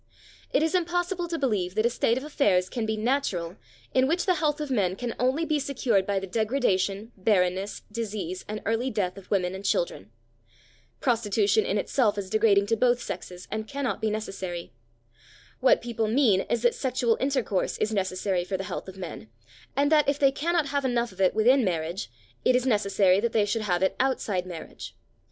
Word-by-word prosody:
It 290 Hz, -, +2 dB
is 320 Hz, -, 0 dB
impossible 355 Hz, 0 st, 0 dB
to 335 Hz, -1 st, -3 dB
believe 205 Hz, -, -1 dB
that 215 Hz, +1 st, +2 dB
a -, -, +4 dB
state 235 Hz, 0 st, +1 dB
of 260 Hz, -, -4 dB
affairs 200 Hz, -12 st, +2 dB
can 230 Hz, -3 st, -3 dB
be 220 Hz, 0 st, -1 dB
natural 215 Hz, -8 st, -1 dB, 0.4 s
in 260 Hz, 0 st, +4 dB
which 335 Hz, +5 st, 0 dB
the 370 Hz, -, +4 dB
health 305 Hz, -2 st, 0 dB
of 300 Hz, -2 st, -4 dB
men 190 Hz, -7 st, +1 dB
can 235 Hz, +3 st, -4 dB
only 260 Hz, +6 st, +1 dB
be 305 Hz, -2 st, +1 dB
secured 255 Hz, -8 st, 0 dB
by 200 Hz, -1 st, 0 dB
the 190 Hz, -, -5 dB
degradation, 210 Hz, -1 st, 0 dB
barrenness, 190 Hz, -1 st, 0 dB
disease 205 Hz, -5 st, -4 dB
and 215 Hz, 0 st, -5 dB
early 225 Hz, +4 st, 0 dB
death 200 Hz, -6 st, -1 dB
of 195 Hz, -2 st, -13 dB
women 185 Hz, -3 st, +1 dB
and 190 Hz, +1 st, -7 dB
children. 105 Hz, -, -1 dB, 0.9 s
Prostitution 215 Hz, -3 st, +2 dB
in 205 Hz, -, 0 dB
itself 210 Hz, 0 st, +1 dB
is 190 Hz, -2 st, -5 dB
degrading 210 Hz, -2 st, +4 dB
to 225 Hz, -, +1 dB
both 245 Hz, +1 st, +3 dB
sexes, 180 Hz, -3 st, -7 dB
and 220 Hz, +1 st, -3 dB
cannot 275 Hz, -2 st, -3 dB
be 220 Hz, -, +1 dB
necessary. 190 Hz, -6 st, -5 dB, 0.9 s
What 255 Hz, -2 st, +4 dB
people 230 Hz, -2 st, -1 dB
mean 220 Hz, -5 st, +3 dB
is 235 Hz, 0 st, 0 dB
that 240 Hz, -, +4 dB
sexual 250 Hz, -3 st, 0 dB
intercourse 260 Hz, -8 st, 0 dB
is 215 Hz, +1 st, -1 dB
necessary 185 Hz, -2 st, 0 dB
for 190 Hz, +1 st, -3 dB
the 195 Hz, -, -4 dB
health 195 Hz, -, -5 dB
of 190 Hz, 0 st, -9 dB
men, 175 Hz, -11 st, -7 dB, 0.5 s
and 285 Hz, +2 st, +3 dB
that 300 Hz, -2 st, +4 dB
if 280 Hz, -, +1 dB
they 275 Hz, -2 st, +4 dB
cannot 320 Hz, +1 st, 0 dB
have 285 Hz, 0 st, 0 dB
enough 240 Hz, -3 st, 0 dB
of 185 Hz, -, -7 dB
it 185 Hz, -, +3 dB
within 250 Hz, +5 st, +4 dB
marriage, 170 Hz, -, -2 dB, 0.3 s
it 255 Hz, -, +4 dB
is 250 Hz, 0 st, +1 dB
necessary 200 Hz, -5 st, +3 dB
that 230 Hz, +2 st, -1 dB
they 215 Hz, -2 st, +3 dB
should 220 Hz, +2 st, -1 dB
have 185 Hz, -3 st, 0 dB
it 190 Hz, -, +1 dB
outside 210 Hz, -8 st, 0 dB
marriage. 170 Hz, -3 st, -8 dB
220 Hz, 195 wpm, -26 LUFS, 190-260 Hz, 0.9 s, a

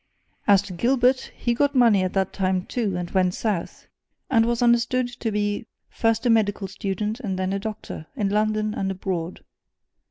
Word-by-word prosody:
As 200 Hz, -2 st, +6 dB
to 200 Hz, -, -8 dB
Gilbert, 250 Hz, +6 st, +2 dB
he 240 Hz, -, 0 dB
got 285 Hz, +4 st, +1 dB
money 230 Hz, -6 st, +5 dB
at 185 Hz, -1 st, -1 dB
that 190 Hz, -1 st, 0 dB
time, 185 Hz, -1 st, 0 dB
too, 210 Hz, -7 st, -2 dB
and 175 Hz, -1 st, -4 dB
went 185 Hz, -2 st, +2 dB
south, 205 Hz, -7 st, -3 dB, 0.5 s
and 225 Hz, -2 st, +4 dB
was 235 Hz, 0 st, +1 dB
understood 240 Hz, +1 st, +3 dB
to 225 Hz, -, -1 dB
be 205 Hz, +2 st, -1 dB, 0.2 s
first 225 Hz, 0 st, 0 dB
a -, -, +3 dB
medical 205 Hz, -3 st, +1 dB
student 205 Hz, +4 st, -3 dB
and 200 Hz, -7 st, -3 dB
then 185 Hz, +1 st, -1 dB
a 200 Hz, -, -1 dB
doctor, 210 Hz, -6 st, -6 dB
in 210 Hz, -6 st, 0 dB
London 215 Hz, +1 st, +1 dB
and 195 Hz, -2 st, -2 dB
abroad. 185 Hz, -3 st, -4 dB
210 Hz, 180 wpm, -24 LUFS, 190-235 Hz, 0.5 s, As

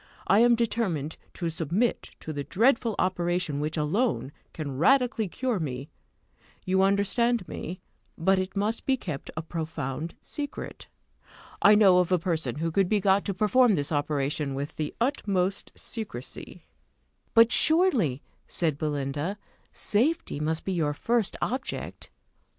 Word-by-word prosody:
I 200 Hz, -, +4 dB
am 240 Hz, +1 st, +6 dB
determined 205 Hz, -10 st, -1 dB, 0.2 s
to 170 Hz, -2 st, -2 dB
submit 170 Hz, -, -1 dB
to 155 Hz, -, -5 dB
the 145 Hz, -1 st, -3 dB
dreadful 230 Hz, -, +2 dB
operation 175 Hz, -4 st, 0 dB
which 155 Hz, +2 st, -2 dB
alone 155 Hz, -, 0 dB, 0.2 s
can 145 Hz, -4 st, -5 dB
radically 250 Hz, -, +3 dB
cure 245 Hz, +3 st, -2 dB
me 135 Hz, -2 st, -5 dB, 0.7 s
you 190 Hz, 0 st, +2 dB
understand 200 Hz, +3 st, +2 dB
me; 180 Hz, +3 st, -6 dB, 0.4 s
but 190 Hz, +3 st, +3 dB
it 185 Hz, +1 st, -4 dB
must 210 Hz, +3 st, -2 dB
be 265 Hz, -1 st, +3 dB
kept 155 Hz, -, -6 dB
a 155 Hz, -, -2 dB
profound 160 Hz, -2 st, -4 dB
secret. 290 Hz, -1 st, -7 dB, 0.7 s
I 205 Hz, +1 st, +7 dB
know 195 Hz, -4 st, +6 dB
of 180 Hz, 0 st, +1 dB
a 180 Hz, -, +5 dB
person 160 Hz, -8 st, -2 dB
who 165 Hz, +2 st, -2 dB
could 190 Hz, +2 st, +2 dB
be 215 Hz, -, +3 dB
got 195 Hz, 0 st, +3 dB
to 200 Hz, -, -1 dB
perform 215 Hz, +3 st, +4 dB
this 145 Hz, -1 st, -2 dB
operation 145 Hz, -1 st, -1 dB
with 140 Hz, +2 st, -5 dB
the 155 Hz, -1 st, -2 dB
utmost 200 Hz, -7 st, 0 dB
secrecy." 180 Hz, -, -6 dB, 0.7 s
"But, 230 Hz, 0 st, +7 dB
surely," 270 Hz, -, +4 dB, 0.2 s
said 155 Hz, -4 st, 0 dB
Belinda, 150 Hz, +4 st, -2 dB, 0.3 s
"safety 250 Hz, -, 0 dB
must 160 Hz, +1 st, -1 dB
be 190 Hz, -, -1 dB
your 150 Hz, -4 st, 0 dB
first 230 Hz, +4 st, 0 dB
object!" 260 Hz, +3 st, -4 dB
185 Hz, 140 wpm, -27 LUFS, 155-225 Hz, 0.7 s, I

